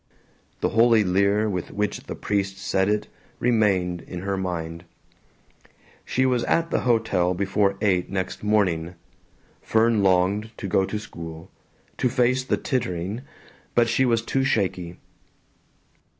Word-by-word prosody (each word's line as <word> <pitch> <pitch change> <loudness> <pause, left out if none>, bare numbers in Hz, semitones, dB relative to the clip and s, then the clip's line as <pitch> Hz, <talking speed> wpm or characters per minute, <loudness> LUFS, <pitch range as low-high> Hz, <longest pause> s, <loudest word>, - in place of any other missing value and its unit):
The - - +2
holy 115 -1 +5
leer 100 +3 +2
with 90 -4 -3
which 105 0 -2
the - - -6
priest 100 -1 -2
said 95 0 0
it 105 0 0 0.3
remained 100 -7 +1
in 90 -1 -7
her 100 +1 -2
mind. 85 -3 -4 1.2
She 130 - 0
was 125 -2 +2
at 165 0 +1
the - - +2
hotel 110 -7 +1
before 100 +1 +1
eight 95 -4 +1
next 95 -1 -3
morning. 90 -6 +1 0.7
Fern 110 -1 +2
longed 100 +4 +1
to 100 - -5
go 95 +1 +2
to 105 - -3
school, 85 -5 -9 0.5
to 125 - +2
face 130 +1 +2
the - - 0
tittering, 100 - -2 0.5
but 120 -1 +4
she 130 - +2
was 115 -3 +2
too 135 +3 0
shaky. 90 -8 -1
100 Hz, 135 wpm, -24 LUFS, 90-115 Hz, 1.2 s, holy